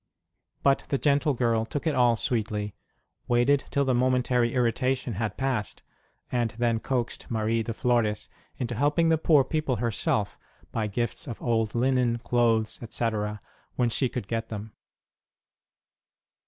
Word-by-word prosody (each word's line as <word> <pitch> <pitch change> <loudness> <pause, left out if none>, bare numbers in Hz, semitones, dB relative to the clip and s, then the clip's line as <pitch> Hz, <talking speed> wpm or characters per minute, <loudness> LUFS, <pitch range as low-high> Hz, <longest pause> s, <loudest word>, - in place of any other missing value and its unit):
But 140 -1 +3
the 140 - +1
gentle 145 +1 +2
girl 115 -2 +1
took 140 +7 -4
it 160 - +2
all 120 -3 +4
sweetly, 105 -3 -2 0.5
waited 125 +4 +3
till 140 0 +1
the 130 - +2
momentary 125 -1 +2
irritation 125 +1 0
had 105 0 -3
passed, 130 -6 -2 0.5
and 120 -2 +1
then 120 -1 +1
coaxed 125 0 -3
Marie 115 0 0
de 115 - -3
Flores 115 -2 0 0.3
into 125 -1 -3
helping 150 +7 +2
the 160 -1 +3
poor 155 -4 +5
people 145 -1 -1
herself 110 -2 -1 0.3
by 110 -2 -1
gifts 120 +9 -3
of 115 - -6
old 115 -2 0
linen, 125 -1 +2
clothes, 115 -2 +1
etc., 105 -3 -2 0.3
when 120 -2 +1
she 130 +2 0
could 120 -6 -5
get 115 0 -3
them. 105 0 -6
120 Hz, 140 wpm, -27 LUFS, 115-130 Hz, 0.5 s, poor